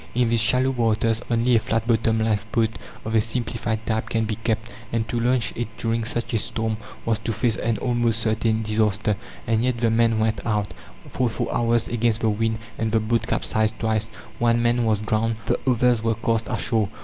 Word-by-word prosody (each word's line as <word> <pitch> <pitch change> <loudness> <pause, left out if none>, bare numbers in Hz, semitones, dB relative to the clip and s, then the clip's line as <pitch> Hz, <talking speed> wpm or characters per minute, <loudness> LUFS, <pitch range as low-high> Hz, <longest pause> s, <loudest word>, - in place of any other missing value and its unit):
In 120 -1 +2
these 115 -1 +3
shallow 125 +3 +3
waters 115 -2 +1
only 120 +1 +3
a - - +5
flat 115 +1 -1
bottomed 110 -1 +2
lifeboat 110 +1 +1 0.4
of 110 - -3
a 110 - +5
simplified 115 -1 -2
type 110 0 -1
can 115 -1 0
be 110 0 -2
kept, 115 0 -2 0.2
and 115 -1 -1
to 120 +2 -2
launch 120 0 +1
it 120 - -2
during 115 0 -1
such 120 0 -2
a 115 - +2
storm 110 +1 -2 0.3
was 115 -2 +1
to 115 - -3
face 115 +1 +1
an 115 -2 0
almost 120 -2 +1
certain 110 0 +1
disaster. 105 -1 +1 0.3
And 115 0 +1
yet 125 -1 +1
the 115 -1 +1
men 115 0 +3
went 110 -2 0
out, 105 -3 -1 0.3
fought 125 -2 0
for - - -2
hours 115 -1 +1
against 115 -1 +1
the 110 - +2
wind, 110 +1 0 0.2
and 110 -1 0
the 115 - +3
boat 115 +1 0
capsized 110 0 0
twice. 110 -1 0 0.3
One 115 0 +3
man 120 0 +2
was 110 -2 +1
drowned, 110 +1 0
the - - 0
others 125 -1 +3
were 115 0 +1
cast 115 -1 0
ashore. 110 -2 0
115 Hz, 200 wpm, -23 LUFS, 110-115 Hz, 0.4 s, a